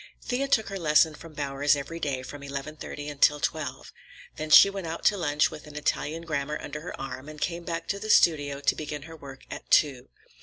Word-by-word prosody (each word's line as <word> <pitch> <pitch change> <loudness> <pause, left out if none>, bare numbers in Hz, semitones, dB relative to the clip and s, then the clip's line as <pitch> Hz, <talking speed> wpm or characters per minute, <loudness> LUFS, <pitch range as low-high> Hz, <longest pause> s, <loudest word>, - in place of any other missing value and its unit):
Thea 265 +2 -1
took 220 -6 +2
her 195 -1 -5
lesson 155 -1 +4
from 160 +1 -12
Bowers 145 0 +1
every 145 +4 -6
day 135 -5 -2
from 145 +2 -9
eleven 140 +2 -6
thirty 145 -1 -7
until 150 0 +3
twelve. 140 -4 -4 0.4
Then 155 0 -5
she 155 - +10
went 195 -3 -5
out 165 +1 -6
to 210 - +5
lunch 150 -5 +1
with 155 0 -10
an 150 - -12
Italian 155 +2 -2
grammar 150 -2 -2
under 150 +1 -6
her 170 - -8
arm, 135 +1 -6
and 155 0 -10
came 170 +3 -2
back 165 -1 -4
to 200 - -1
the 215 - -6
studio 145 -7 +4
to - - +2
begin 150 -2 -5
her 165 +1 -10
work 135 -3 -11
at - - -8
two. 135 -5 +3
150 Hz, 220 wpm, -27 LUFS, 145-165 Hz, 0.4 s, she